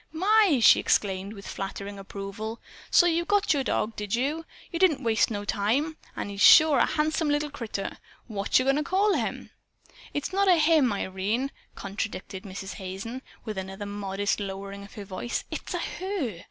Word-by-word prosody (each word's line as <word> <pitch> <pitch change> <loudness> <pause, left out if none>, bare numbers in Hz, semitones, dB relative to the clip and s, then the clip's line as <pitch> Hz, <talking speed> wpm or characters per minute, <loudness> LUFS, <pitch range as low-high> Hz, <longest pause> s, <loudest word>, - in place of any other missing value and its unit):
"My!" 385 - +4
she - - +8
exclaimed 195 0 0
with 195 -2 -11
flattering 200 +1 -5
approval. 200 +3 -6 0.3
"So 350 - +6
you 340 0 +2
got 410 -1 +2
your 280 -2 0
dog, 220 -2 -1
did 210 0 -2
you? 295 +7 -1 0.3
You 335 - -3
didn't 355 -6 +3
waste 225 -2 +3
no 205 -2 -4
time. 235 +11 0 0.2
And 205 - -4
he's 200 0 -5
sure 310 -2 +8
a - - +4
handsome 310 0 0
little 295 0 0
critter. 225 -7 -5 0.3
Whatcher 210 +3 +1
goin' 270 +2 +2
to 300 - 0
call 390 +6 +2
him?" - - -3 0.6
"It's 290 +5 -3
not 395 +1 +2
a 365 - +7
him, 310 -6 +4
Irene," 205 +7 -2 0.2
contradicted 195 -1 -5
Mrs. 195 0 -6
Hazen, 195 +7 -6 0.2
with 215 -4 -4
another 195 +2 -6
modest 200 0 -2
lowering 200 0 -6
of 200 - -13
her 205 -2 -7
strong 185 -1 -7
voice. 240 - -2
"It's - - -4
a - - +1
HER. 350 - -3
225 Hz, 180 wpm, -27 LUFS, 200-305 Hz, 0.6 s, she